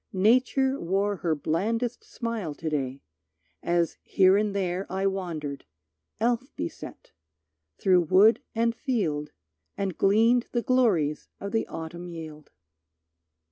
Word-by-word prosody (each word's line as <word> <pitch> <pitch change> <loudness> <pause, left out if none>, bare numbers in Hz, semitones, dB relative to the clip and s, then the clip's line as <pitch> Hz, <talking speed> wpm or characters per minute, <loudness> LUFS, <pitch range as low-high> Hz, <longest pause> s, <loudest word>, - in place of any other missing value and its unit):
Nature 255 +7 +3
wore 195 +3 0
Her 165 -2 0
blandest 225 +11 -1
smile 225 -10 -4
to 160 +1 -4
day, 135 -2 -3 0.6
as 170 -1 0
here 190 0 +4
and 205 0 +1
there 185 -1 -2
I 190 +1 -1
wandered, 170 -7 -3 0.6
elf 240 +4 0
beset, 85 - -7 0.7
through 185 -2 +4
wood 195 +7 +5
and 230 +1 +2
field 190 - -2 0.5
And 195 -3 -2
gleaned 225 +5 +3
the 240 -1 0
glories 195 - +2
of 200 - -5
the 225 - 0
autumn 170 +2 -7
yield. 160 -3 -9
195 Hz, 120 wpm, -27 LUFS, 165-230 Hz, 0.7 s, wood